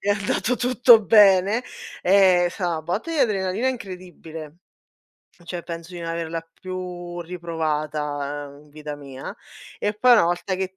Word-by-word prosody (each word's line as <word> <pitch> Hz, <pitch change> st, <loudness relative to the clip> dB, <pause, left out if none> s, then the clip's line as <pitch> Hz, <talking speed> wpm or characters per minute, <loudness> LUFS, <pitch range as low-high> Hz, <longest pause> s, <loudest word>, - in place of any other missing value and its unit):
è 205 Hz, -, -4 dB
andato 210 Hz, +4 st, 0 dB
tutto 245 Hz, -2 st, +5 dB
bene." 205 Hz, +2 st, +5 dB, 0.4 s
Ehm, 185 Hz, -2 st, +5 dB
è -, -, +1 dB
sta 180 Hz, 0 st, -3 dB
na 160 Hz, -1 st, -2 dB
botta 180 Hz, -, -3 dB
di 325 Hz, -, -2 dB
adrenalina 210 Hz, 0 st, +1 dB
incredibile. 180 Hz, -, -8 dB, 0.8 s
F 175 Hz, -, -23 dB
cioè 170 Hz, 0 st, -6 dB
penso 170 Hz, +1 st, -7 dB
di 175 Hz, -, -6 dB
non 165 Hz, 0 st, -4 dB
averla 165 Hz, 0 st, -3 dB, 0.2 s
più 180 Hz, -1 st, -6 dB
riprovata, 150 Hz, -4 st, -3 dB
uhm, 145 Hz, -, -16 dB
in 150 Hz, -, -22 dB
vita 150 Hz, 0 st, -7 dB
mia; 135 Hz, -2 st, -9 dB, 0.5 s
e 205 Hz, +1 st, 0 dB
poi 245 Hz, +4 st, +5 dB
una 215 Hz, -7 st, +6 dB
volta 175 Hz, +2 st, -1 dB
che 190 Hz, 0 st, -2 dB
t 190 Hz, -, -39 dB
180 Hz, 165 wpm, -23 LUFS, 160-200 Hz, 0.8 s, una